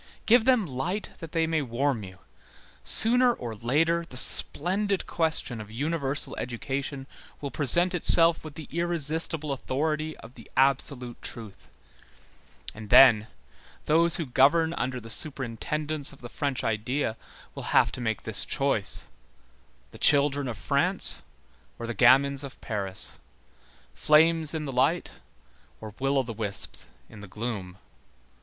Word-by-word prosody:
Give 230 0 +4
them 250 -5 +3
light 170 +9 -4
that 165 -2 -9
they 165 -1 +1
may 160 -1 0
warm 130 -1 -1
you. 95 -1 -11 0.7
Sooner 245 - +5
or 120 -2 -6
later 155 +10 0
the 130 -6 -10
splendid 195 +9 0
question 160 -8 -1
of 105 - -11
universal 140 +3 -2
education 135 +3 -4 0.3
will 140 -2 -6
present 175 +6 +2
itself 165 -1 +3
with 155 -2 -10
the 155 - -9
irresistible 165 -2 +1
authority 150 +4 -3
of 115 +2 -14
the 115 - -15
absolute 130 -2 0
truth; 110 -4 -9 1.0
and 105 -1 -11
then, 110 -5 +7 0.6
those 165 +2 +3
who 165 - -1
govern 155 +6 +3
under 130 -5 -3
the 115 - -12
superintendence 145 +3 -1
of 140 - -16
the 120 - -9
French 140 -1 -3
idea 115 +2 -2 0.4
will - - -7
have - - +3
to - - -7
make 110 -5 -3
this 110 -2 0
choice; 135 -7 +1 0.9
the - - -14
children 140 -1 +3
of 115 -4 -5
France 85 - +1 0.6
or 115 - -6
the 120 - -4
gamins 135 +5 +4
of 140 -2 -10
Paris; 100 -5 -4 0.7
flames 160 +1 +3
in 155 -1 -3
the 135 - -5
light 135 +7 0 0.6
or 110 -2 -9
will 135 +1 0
o' 135 - +2
the 115 -2 -7
wisps 105 -2 -5 0.2
in 105 - -13
the 105 - -10
gloom. 100 -3 -6
140 Hz, 140 wpm, -26 LUFS, 120-160 Hz, 1.0 s, then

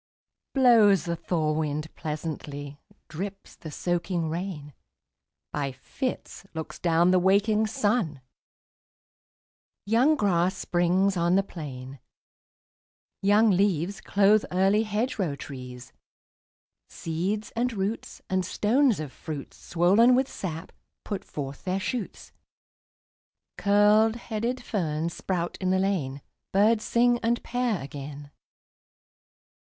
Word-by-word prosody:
Blows 220 - +5
the 170 -1 -1
thaw 160 -2 -1
wind 155 0 -2
pleasantly, 145 -2 -6 0.3
Drips 195 +5 -7
the 160 - -9
soaking 175 +1 -1
rain, 165 -4 -5 0.8
By 140 -2 -2
fits 250 - -5
looks 160 -1 -6
down 170 +1 +3
the 185 - +5
waking 210 +4 +3
sun: 205 - 0 1.7
Young 240 +9 +4
grass 190 - +1
springs 185 +3 +1
on 170 +1 +2
the 195 - +3
plain; 135 -7 -8 1.2
Young 210 +2 +4
leaves 195 0 +1
clothe 205 +1 +4
early 195 +3 +3
hedgerow 210 - -1
trees; 125 -2 -9 1.0
Seeds, 190 +6 -3
and 245 +2 0
roots, 205 +1 -4
and 185 0 0
stones 235 - +2
of 150 -3 -5
fruits, 145 -1 -8
Swollen 200 +9 +4
with 260 +1 +2
sap, 165 -8 -6 0.3
put 200 - -4
forth 140 -1 -7
their 185 +1 -1
shoots; 225 +2 -5 1.2
Curled 210 +2 +4
headed 235 +2 -3
ferns 170 -6 -2
sprout 175 -2 -3
in 185 - 0
the 190 - +3
lane; 165 -9 -1 0.3
Birds 215 +3 +3
sing 240 0 +3
and 235 +1 0
pair 240 - -1
again. 145 +1 -8
185 Hz, 110 wpm, -27 LUFS, 155-215 Hz, 1.7 s, Blows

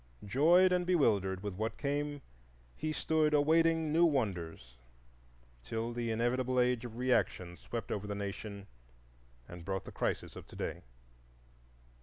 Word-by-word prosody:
Joyed 170 - +5
and 180 0 +2
bewildered 100 - +2
with 105 -2 -3
what 110 +4 -3
came, 145 0 -2 0.5
he 155 0 -2
stood 155 -1 +2
awaiting 160 +1 +3
new 165 +2 +5
wonders 90 - -1 0.9
till 115 - -3
the 120 -1 -2
inevitable 125 +3 +1
Age 125 -1 +2
of 115 -1 -8
Reaction 100 -8 0
swept 115 +3 -6
over 105 0 -3
the 100 - -3
nation 100 0 -5 0.8
and 85 -1 -9
brought 95 +1 -3
the - - -8
crisis - - -2
of - - -10
to - - -13
day. - - -4
120 Hz, 140 wpm, -33 LUFS, 100-150 Hz, 0.9 s, Joyed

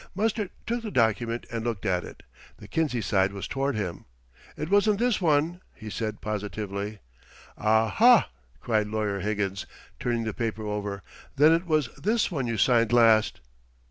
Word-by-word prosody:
Mustard 215 0 0 0.2
took 235 +1 -2
the 225 - -5
document 115 - 0
and 115 -1 -3
looked 115 -4 -3
at 90 -3 +1
it. - - -12 0.3
The - - -12
Kinsey 150 -7 -1
side 95 -1 +1
was 100 -1 -6
toward 135 0 -1
him. 95 -5 -4 0.5
"It 155 - -3
wasn't 205 +1 +4
this 240 -2 +1
one," 165 +2 +1
he 110 -1 -9
said 110 -1 -4
positively. 105 0 -4 0.5
"Ah, 110 +1 +2
ha!" 235 - +5 0.3
cried 110 -3 0
Lawyer 105 -2 -2
Higgins, 100 -1 -2 0.3
turning 120 -2 -1
the 110 -1 -3
paper 110 -2 -3
over. 100 -2 -4 0.3
"Then 150 +3 +6
it 170 +2 +1
was 155 -5 +1
this 220 0 +1
one 135 -7 -2
you 115 -1 -2
signed 115 +1 +3
last!" 115 - +4
115 Hz, 165 wpm, -26 LUFS, 105-155 Hz, 0.5 s, Then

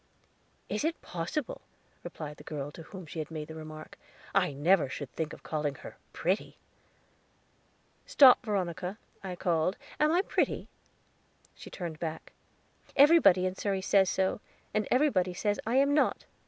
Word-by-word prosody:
"Is - - -2
it 325 +1 -1
possible!" 180 - -4 0.4
replied 150 -2 -7
the - - -13
girl 145 -2 -5
to 165 - -11
whom 185 +2 -10
she 160 +1 -7
had 155 - -4
made 155 -2 -6
the - - -7
remark. 155 -1 -10 0.3
"I - - +3
never 150 +2 +3
should 140 -1 -6
think 160 -2 -3
of - - -11
calling 150 -2 -2
her - - -11 0.2
pretty." 185 +5 -1 1.5
"Stop, 265 -3 +7
Veronica," 185 -3 -2 0.3
I 185 -2 -5
called; 175 +1 0 0.2
"am 300 +1 +4
I 355 +3 +3
pretty?" - - -1 0.8
She - - -12
turned 170 -4 -6
back. 160 -1 -5 0.6
"Everybody 280 - +6
in 185 - 0
Surrey 195 0 -2
says 190 -1 +4
so; 190 +2 0 0.3
and 215 -1 0
everybody 200 -10 +2
says 205 +2 0
I 235 - +1
am 280 +2 +4
not." 295 - +1
180 Hz, 155 wpm, -30 LUFS, 160-210 Hz, 1.5 s, Stop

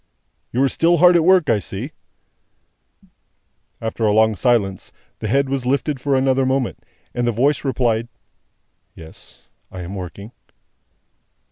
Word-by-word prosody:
"You 130 +3 +1
are - - +4
still 170 +5 +2
hard 180 +2 +6
at 170 - +4
work, 185 -1 +4
I 110 -3 +2
see?" 95 - -6 1.9
After 115 0 -4
a 105 - +3
long 110 +1 +3
silence, 100 -6 0 0.3
the - - -4
head 140 0 +1
was 135 -2 -3
lifted 140 0 -1
for 140 0 +1
another 130 0 +2
moment, 130 -1 -1 0.3
and 120 0 -1
the - - +2
voice 135 +6 +1
replied, 120 -4 0 0.9
"Yes 80 -1 -14 0.3
I 95 -1 -7
am 90 +2 -7
working." 100 +3 -8
125 Hz, 140 wpm, -20 LUFS, 110-140 Hz, 1.9 s, hard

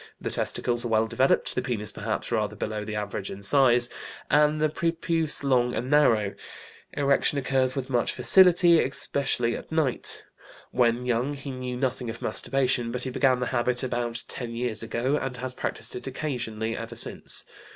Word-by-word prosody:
The - - -4
testicles 120 -1 0
are - - -2
well 110 -1 +2
developed, 130 +4 +1
the - - -1
penis 110 -5 -3
perhaps - - -4
rather - - -1
below 105 -1 -4
the 105 0 -5
average 105 -1 -4
in 100 +1 -8
size, 120 +1 +4 0.4
and 150 +1 +4
the 155 - +3
prepuce 165 -1 0
long 125 -3 +2
and 125 +4 -3
narrow. 115 -9 +3 0.6
Erection 140 0 +2
occurs 130 -1 +1
with 135 -2 -3
much 120 -3 +1
facility, 175 -3 +6
especially 130 -3 0
at - - -9
night. 155 -6 0 0.5
When 120 0 +1
young 125 +4 0
he 140 0 -7
knew 125 -1 -5
nothing 125 -2 -2
of 115 +1 -6
masturbation, 125 -3 0
but 125 +1 -3
he 130 - -4
began 130 -1 +2
the - - 0
habit 125 0 0
about 120 -2 -2
ten 120 -2 -5
years 115 -3 -2
ago, 120 +5 -1
and 135 -3 -4
has 130 +1 -5
practised - - -4
it 125 - -6
occasionally 115 -5 -3
ever 115 +1 -7
since. 115 - -1
125 Hz, 170 wpm, -26 LUFS, 115-140 Hz, 0.6 s, facility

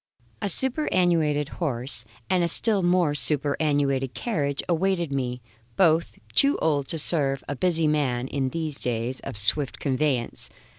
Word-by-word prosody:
A 200 - -1
superannuated 175 - +2
horse 125 -6 -4 0.2
and 180 -1 +1
a - - +1
still 205 +4 +2
more 175 -3 +2
superannuated 145 -2 +1
carriage 145 - -2
awaited 175 -3 0
me 125 -2 -3 0.3
both 170 -2 +2 0.2
too 280 0 +4
old 145 -4 0
to 165 - -2
serve 140 -4 +1
a 145 - -3
busy 165 +1 0
man 135 -5 0
in 135 -1 -2
these 155 -1 -3
days 120 +1 -2
of - - -7
swift 125 +7 +3
conveyance. 135 -3 -1
150 Hz, 140 wpm, -24 LUFS, 135-170 Hz, 0.3 s, too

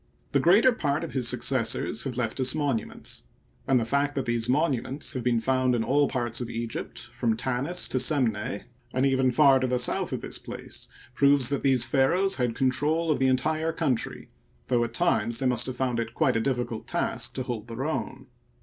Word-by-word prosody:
The - - +2
greater 205 +9 +5
part 150 -9 -1
of 165 - -6
his 130 -3 0
successors 120 -1 +1
have 130 -3 -4
left 120 0 -2
us 130 +2 +3
monuments; 140 -7 -2 0.4
and 130 -2 +3
the 115 - -2
fact 140 +4 0
that 135 -2 -2
these 120 0 -1
monuments 140 0 -1
have 130 - -3
been 120 -1 +1
found 130 +1 +1
in 115 - 0
all 140 +4 +2
parts 120 -2 -2
of 120 - -4
Egypt 115 -1 -5 0.2
from 115 -2 -1
Tanis 130 +9 0
to 130 - 0
Semneh, 115 -7 +1 0.3
and 130 +1 +2
even 130 -1 +2
far 135 +1 +5
to 130 - 0
the 125 0 0
south 125 - +1
of - - -3
this - - -3
place, - - -6 0.3
proves 140 -1 +4
that 140 -1 -1
these 130 -3 +3
pharaohs 165 +10 +2
had 120 -3 -1
control 150 +5 +1
of - - 0
the 135 - +2
entire 155 +5 0
country, 150 -8 -2 0.4
though 120 -2 +2
at 115 0 -4
times 115 -9 +2
they 130 - -2
must 125 -2 +3
have 130 -1 -5
found 125 -2 -1
it 115 0 -4
quite - - +2
a 115 - +1
difficult 120 -2 -3
task 120 +1 -2
to 130 - -2
hold 120 -4 -5
their 120 +4 -5
own. 135 -4 -4
130 Hz, 205 wpm, -26 LUFS, 120-140 Hz, 0.4 s, greater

